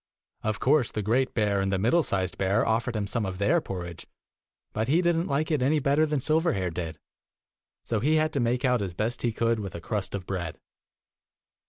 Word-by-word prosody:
Of 110 0 -2
course 135 -2 +3
the 105 - -3
great 125 +5 +1
bear 105 -3 +2
and 95 0 0
the 95 - +1
middle 120 - +3
sized 95 - -2
bear 100 +3 +2
offered 115 +2 0
him 105 -1 -1
some 110 +3 -1
of 95 -2 -3
their 100 +1 +2
porridge, 85 -3 -7 0.7
but 110 +1 -1
he 155 +6 +3
did 175 -1 +2
n't 165 +2 0
like 150 +3 0
it 150 -4 +1
any 145 +5 +3
better 145 +2 +2
than 150 -2 0
Silverhair 155 - +1
did, 80 -2 -4 0.9
so 115 - -1
he 150 +8 +2
had 155 0 +2
to 140 - 0
make 125 +2 +1
out 125 -3 +2
as 95 -3 -4
best 110 +5 -2
he 120 - +1
could 115 0 +1
with 95 -4 -6
a - - -4
crust 100 +3 -3
of 95 -2 -5
bread. 90 -4 -4
115 Hz, 215 wpm, -27 LUFS, 95-140 Hz, 0.9 s, course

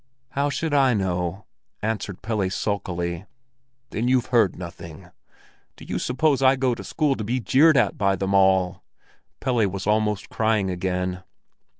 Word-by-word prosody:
"How 140 +1 0
should 155 +1 -2
I 135 -4 +4
know?" 90 -1 -2 0.4
answered 105 -3 -3
Pelle 105 -4 -1
sulkily. 90 -2 -3 0.6
"Then 115 +3 -1
you've 130 -1 +3
heard 115 -6 +4
nothing?" 85 -3 -10 0.6
"Do - - -13
you - - -3
suppose 135 +2 +1
I'll 135 0 +5
go 130 -1 +1
to 115 - -7
school 150 -3 0
to 110 - -4
be 120 +5 -1
jeered 140 +7 +4
at - - +1
by 100 -1 +2
them 95 +1 -2
all?" 95 -1 +3 0.6
Pelle 120 -5 +1
was 95 0 -5
almost 105 -1 0
crying 110 -5 +1
again. 90 0 -2
105 Hz, 155 wpm, -24 LUFS, 95-125 Hz, 0.6 s, I'll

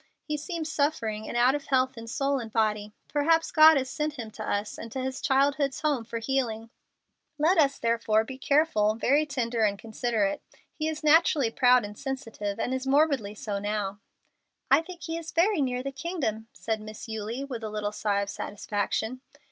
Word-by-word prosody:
He 300 - -3
seems 320 +1 -4
suffering 225 -8 -1
and - - -3
out 245 +2 +5
of 290 -1 -3
health 260 -1 +2
in 230 -1 -9
soul 275 +3 0
and 225 -2 -7
body. 215 -2 0 0.2
Perhaps 325 +3 +2
God 315 -1 +8
has 265 -1 -1
sent 300 +3 -2
him 230 -6 -7
to 215 - -7
us 205 0 -2
and 230 - -8
to 265 - -4
his 260 0 -3
childhood's 275 0 +1
home 290 -7 0
for 230 - -5
healing. 230 -2 -2 0.7
Let 325 +4 +3
us, 280 -2 +3
therefore, 230 -2 +2
be 265 - -8
very 260 - -12
careful, 275 -8 +2
very 285 +7 +2
tender 240 -5 -1
and 200 -1 +2
considerate. 220 -2 -1 0.3
He 310 - -2
is 315 0 -4
naturally 300 -5 +4
proud 250 -2 +4
and 205 0 -8
sensitive, 225 -6 -5
and 250 - -1
is 260 0 -3
morbidly 275 -7 +2
so 205 -1 -4
now." 205 -1 -2 0.7
"I 275 +3 +7
think 345 -1 -11
he 325 +1 -3
is 330 -1 -8
near 290 -10 +2
the 275 - -3
Kingdom," 275 - -3
said 220 -1 -3
Miss 215 +2 -9
Eulie, 220 +4 -4
with 250 -5 -6
a 215 - -3
little 210 -1 -3
sigh 205 -1 0
of 200 - -6
satisfaction. 210 +4 -3
255 Hz, 190 wpm, -27 LUFS, 220-290 Hz, 0.7 s, God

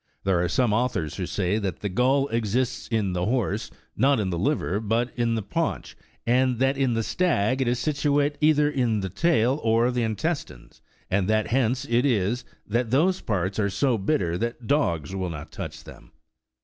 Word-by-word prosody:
There 90 -3 +2
are 90 - 0
some 120 +4 +2
authors 110 - -1
who 90 -3 -3
say 100 +2 0
that 95 -5 -4
the 105 - -1
gall 130 +8 +2
exists 115 +2 -1
in 105 -5 0
the 90 +1 -1
horse, 110 -3 -1 0.3
not 135 0 +3
in 95 -3 -1
the 85 - -2
liver, 105 - 0
but 115 +3 0
in 120 -2 0
the 110 - -2
paunch, - - -3 0.3
and 125 +1 +2
that 135 +3 +2
in 130 -3 +1
the 115 - 0
stag 130 - +1
it 130 - +1
is 120 +1 +1
situate 145 +2 +1
either 150 -1 +4
in 125 -7 0
the 95 - -3
tail 135 - +2
or 115 +2 +3
the 125 -1 -1
intestines; 110 - -3 0.3
and 95 +1 +1
that 110 0 +1
hence 130 +1 +1
it 120 -1 +2
is, 120 -2 +1 0.2
that 115 +2 -1
those 175 +9 +2
parts 95 -2 -2
are 100 -1 +1
so 125 +6 +1
bitter 95 - 0
that 120 +1 -3
dogs 95 - 0
will 95 -2 -2
not 75 -3 -7
touch - - -7
them. - - -14
115 Hz, 190 wpm, -25 LUFS, 100-130 Hz, 0.3 s, either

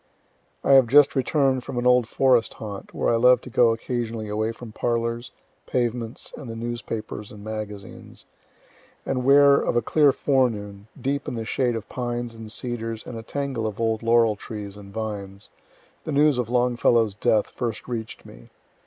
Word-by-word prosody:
I - - +2
have 135 -3 +7
just 145 +4 +5
return'd 135 -1 +1
from 125 - -6
an 120 - -1
old 125 -2 +4
forest 125 -2 +2
haunt, 105 -3 -8
where - - 0
I - - +3
love 125 +2 +6
to 125 - -11
go 115 0 +4
occasionally 115 -1 -3
away 110 +2 -1
from 115 0 -10
parlors, 115 +1 -2 0.4
pavements, 120 -2 -2
and 135 -5 -9
the 115 - -6
newspapers 115 -2 -5
and 105 -1 -11
magazines 105 -2 -7 0.8
and 130 -1 -1
where, 140 +1 +6
of - - 0
a 120 - +3
clear 145 +3 +4
forenoon, 110 -8 -1
deep 140 +1 -2
in - - -3
the 115 -1 -4
shade 120 +1 0
of 115 - -6
pines 120 -1 -4
and 110 -1 -9
cedars 115 -2 -4
and - - -7
a 115 - -5
tangle 130 -2 -3
of 105 -1 -6
old 115 -1 0
laurel 115 -2 +3
trees 105 -1 -7
and 100 -1 -12
vines, 100 -2 -6 0.5
the - - -4
news 145 -2 +3
of 120 -2 -2
Longfellow's 120 -3 +2
death 105 +1 +1
first 115 -3 -4
reach'd 115 -3 -6
me. - - -14
115 Hz, 175 wpm, -24 LUFS, 110-125 Hz, 0.8 s, have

